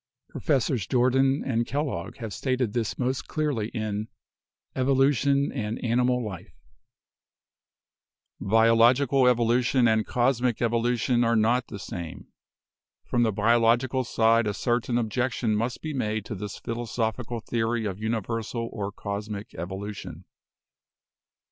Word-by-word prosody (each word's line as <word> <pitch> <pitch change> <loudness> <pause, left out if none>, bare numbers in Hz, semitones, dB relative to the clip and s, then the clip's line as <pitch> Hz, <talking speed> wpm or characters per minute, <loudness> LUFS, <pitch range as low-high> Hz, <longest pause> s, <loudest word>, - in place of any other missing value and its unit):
Professors 130 - 0
Jordan 135 +3 +2
and 120 -3 0
Kellogg 140 +1 -3
have 110 -5 -6
stated 130 -3 -1
this 115 -3 -2
most 130 +1 -2
clearly 145 -9 -1
in 110 -2 -3 0.7
'Evolution 140 +1 +2
and 110 -4 -3
Animal 125 +1 +1
Life': 95 -5 -8 1.8
"Biological 115 +5 +4
evolution 120 +1 +3
and 110 -1 +3
cosmic 125 -1 +1
evolution 120 +1 +1
are 115 0 +2
not 115 +3 +2
the 105 - -7
same. 85 -4 -7 0.8
From 120 - 0
the 115 -2 +3
biological 115 +5 +2
side 115 -1 +3
a 105 - -1
certain 120 +1 0
objection 120 -1 0
must 115 +3 -2
be 155 -1 -3
made 110 -5 -2
to 110 - -5
this 105 -1 -6
philosophical 115 0 -3
theory 115 0 -1
of 100 -1 -4
universal 115 +1 -3
or 100 -1 -3
cosmic 100 +1 -6
evolution. 95 +4 -7
115 Hz, 115 wpm, -26 LUFS, 110-125 Hz, 1.8 s, Biological